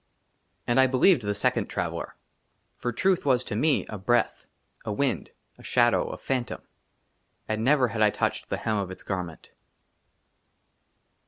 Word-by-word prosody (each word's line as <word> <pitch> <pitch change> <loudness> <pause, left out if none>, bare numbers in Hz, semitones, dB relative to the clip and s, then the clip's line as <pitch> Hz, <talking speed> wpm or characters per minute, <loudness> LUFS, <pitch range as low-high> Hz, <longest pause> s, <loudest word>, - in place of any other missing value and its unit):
AND 120 +2 +2
I 130 - +6
BELIEVED 130 +4 +4
THE 105 -1 -2
SECOND 105 - 0
TRAVELLER; - - -4 0.6
FOR 120 - -2
TRUTH 185 +10 +1
WAS 130 -3 +2
TO 105 - -5
ME 150 +6 +2
A 105 - -7
BREATH, 120 +5 0 0.4
A 110 - -3
WIND, 135 +5 -1 0.3
A - - -14
SHADOW, - - +3
A - - -6
PHANTOM, 125 -4 -3 0.8
AND 110 0 -1
NEVER 130 -1 +4
HAD 110 0 -3
I 105 - +6
TOUCHED - - -2
THE - - -1
HEM 110 -1 -1
OF 100 -2 -2
ITS 95 - -9
GARMENT. 90 -4 -5
120 Hz, 155 wpm, -26 LUFS, 105-130 Hz, 0.8 s, I